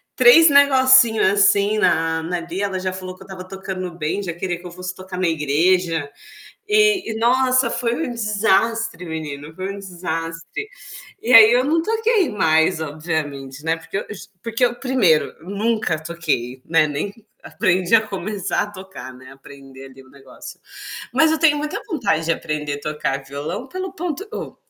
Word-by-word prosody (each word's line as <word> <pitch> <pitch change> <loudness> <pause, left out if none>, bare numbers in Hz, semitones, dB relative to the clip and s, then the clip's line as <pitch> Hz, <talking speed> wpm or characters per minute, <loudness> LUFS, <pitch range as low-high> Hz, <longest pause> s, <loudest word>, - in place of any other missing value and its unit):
3 330 -10 +7
negocinho, 260 -5 +5
assim, 205 +1 +3
na 160 -3 +1
na 180 +2 -2
ali, 170 +3 -5
ela 195 -2 -2
já 185 0 -2
falou 185 0 -7
que 190 - -14
eu - - -17
estava 185 -1 -9
tocando 190 -1 -6
bem, 175 +5 -2
já 175 - -4
queria 175 0 -4
que 180 - -16
eu - - -10
fosse 180 +1 -7
tocar 185 -1 -9
na 185 - +1
igreja. 165 +1 +1 0.6
E 420 - +3
e, 220 - -5
nossa, 255 +1 +3
foi 235 -1 -1
um - - -5
desastre, 220 -3 0
menino, 155 -2 -6
foi 190 +2 -4
um 200 - -9
desastre. 170 - -6 0.5
E 245 - -2
aí 225 -1 +10
eu 250 - +3
não 325 +3 +2
toquei 445 -1 +1
mais 160 -3 +2
obviamente, 145 -3 -5
né, 165 +1 +1
porque 165 +4 -6
eu - - -4
ju 205 - -8 0.2
porque 230 +2 +1
eu 240 - 0
1º, 235 - +2 0.2
nunca 200 -4 -1
toquei, 150 -7 -3
né, 160 -2 +3
nem 150 +8 -4 0.3
aprendi 185 -1 0
a 220 - +5
começar 195 0 -3
a 205 - -8
tocar, 190 -9 -10
né, 130 +1 -14
aprender 135 0 -14
ali 135 0 -14
o 130 - -21
negócio. 135 -1 -12 0.6
Mas 320 -1 +4
eu 320 - 0
tenho 305 -2 +4
muita 300 +1 -4
vontade 200 - -1
de 165 - +2
aprender 150 -3 -4
tocar 150 -2 -3
violão 150 - -6
pelo 370 +2 -5
ponto 355 +3 -4
ô - - -7
185 Hz, 175 wpm, -20 LUFS, 160-230 Hz, 0.6 s, aí